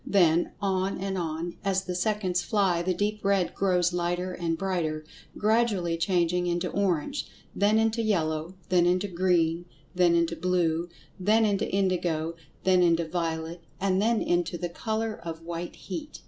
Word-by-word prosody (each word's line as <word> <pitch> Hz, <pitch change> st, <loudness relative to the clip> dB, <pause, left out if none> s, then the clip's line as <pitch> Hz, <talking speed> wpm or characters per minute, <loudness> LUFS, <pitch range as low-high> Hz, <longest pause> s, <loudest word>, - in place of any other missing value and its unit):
Then, 175 Hz, -4 st, +3 dB
on 195 Hz, -1 st, 0 dB
and 195 Hz, 0 st, -3 dB
on, 170 Hz, -1 st, -3 dB
as 195 Hz, -1 st, +1 dB
the 185 Hz, -1 st, -4 dB
seconds 185 Hz, -1 st, 0 dB
fly, 190 Hz, -4 st, +1 dB
the 185 Hz, +2 st, 0 dB
deep 210 Hz, +2 st, -1 dB
red 195 Hz, -2 st, +2 dB
grows 180 Hz, -2 st, +1 dB
lighter 175 Hz, +1 st, -1 dB
and 165 Hz, -2 st, -2 dB
brighter, 165 Hz, -5 st, -2 dB, 0.3 s
gradually 210 Hz, -6 st, +2 dB
changing 175 Hz, 0 st, +1 dB
into 175 Hz, +1 st, -1 dB
orange, 200 Hz, -, -1 dB, 0.3 s
then 205 Hz, +2 st, +3 dB
into 225 Hz, +1 st, +2 dB
yellow, 165 Hz, -5 st, -1 dB
then 175 Hz, -2 st, +4 dB
into 180 Hz, +3 st, +2 dB
green, 175 Hz, -2 st, +1 dB, 0.3 s
then 175 Hz, -2 st, +4 dB
into 170 Hz, 0 st, +1 dB
blue, 170 Hz, -1 st, 0 dB, 0.3 s
then 215 Hz, +4 st, +3 dB
into 200 Hz, -2 st, 0 dB
indigo, 175 Hz, -4 st, 0 dB, 0.3 s
then 185 Hz, -1 st, +4 dB
into 170 Hz, -1 st, +3 dB
violet, 165 Hz, 0 st, -3 dB, 0.2 s
and 190 Hz, 0 st, +1 dB
then 225 Hz, +1 st, +2 dB
into 175 Hz, 0 st, 0 dB
the 175 Hz, 0 st, -3 dB
color 220 Hz, +4 st, -3 dB
of 165 Hz, -1 st, -6 dB
"white 170 Hz, +1 st, -5 dB
heat." 305 Hz, -2 st, -7 dB
180 Hz, 155 wpm, -27 LUFS, 170-195 Hz, 0.3 s, then